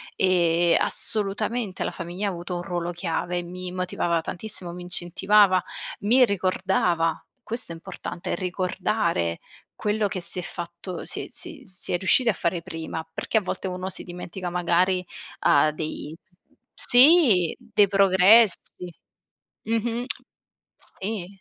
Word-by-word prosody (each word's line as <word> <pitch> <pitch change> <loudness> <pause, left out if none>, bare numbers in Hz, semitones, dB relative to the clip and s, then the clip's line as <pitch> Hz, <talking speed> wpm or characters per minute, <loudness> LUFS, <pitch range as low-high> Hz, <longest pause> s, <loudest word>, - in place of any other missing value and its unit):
e 175 -2 +3
assolutamente 210 0 0
la - - -2
famiglia 180 +4 -4
ha 195 - 0
avuto 175 +1 -5
un 175 - -3
ruolo 175 -2 -3
chiave, 175 0 -2
mi 180 +1 -7
motivava 180 -2 0
tantissimo, 180 0 -6
mi 180 - -8
incentivava, 185 +2 +3 0.4
mi 245 +5 +5
ricordava. 185 -4 0 0.2
Questo 230 -5 -4
è - - -8
importante: 170 +1 -5
ricordare 180 - -1 0.4
quello 210 0 0
che 185 - -3
si 180 - 0
è - - -2
fatto 175 +1 -7
si - - -4
è - - -11
si 340 -3 -10
si 180 -1 -5
è - - +3
riusciti 195 +7 +2
a - - +3
fare 170 -1 -1
prima, 160 0 -6
perché 220 - -1
a - - +4
volte 190 0 -4
uno 185 +1 -4
si 190 - -7
dimentica 180 +1 -6
magari, 180 +1 +1 0.3
ha 150 +2 +4
dei 155 0 -5 0.6
sì, 245 - +5
dei 205 -1 +2
progressi. 190 -1 +4 0.7
Mh-mh. 230 +2 -1 1.0
Sì, 200 -3 -3
180 Hz, 135 wpm, -25 LUFS, 175-205 Hz, 1.0 s, mi